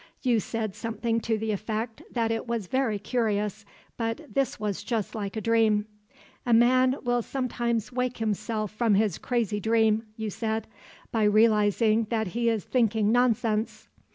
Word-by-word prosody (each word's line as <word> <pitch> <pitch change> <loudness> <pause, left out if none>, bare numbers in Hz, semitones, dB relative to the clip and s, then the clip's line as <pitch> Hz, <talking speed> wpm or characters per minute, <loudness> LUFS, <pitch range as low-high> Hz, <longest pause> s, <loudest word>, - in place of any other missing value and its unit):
You 245 -4 +3
said 220 0 -3
something 225 +1 -2
to 225 0 -1
the 220 0 -2
effect 220 +2 -3
that 230 -2 0
it 225 +2 -2
was 235 -4 -2
very 255 0 0
curious 210 -1 -1 0.3
but 230 +5 -2
this 275 -1 0
was 205 -1 -3
just 225 -3 -2
like 205 -1 -4
a - - -2
dream. 220 -1 +3 0.6
'A 240 - +1
man 255 +2 +4
will 245 -1 +1
sometimes 235 -3 -2
wake 250 0 -2
himself 215 -1 -2
from 215 -1 +2
his 205 -3 +1
crazy 230 -4 -1
dream,' 220 +1 +2
you 220 -2 -3
said, 220 +1 -2 0.5
'by 220 -2 +2
realizing 215 +1 +3
that 220 -4 -1
he 235 +4 0
is 220 -4 0
thinking 220 -4 +2
nonsense. 230 -2 +1
225 Hz, 155 wpm, -27 LUFS, 215-235 Hz, 0.6 s, man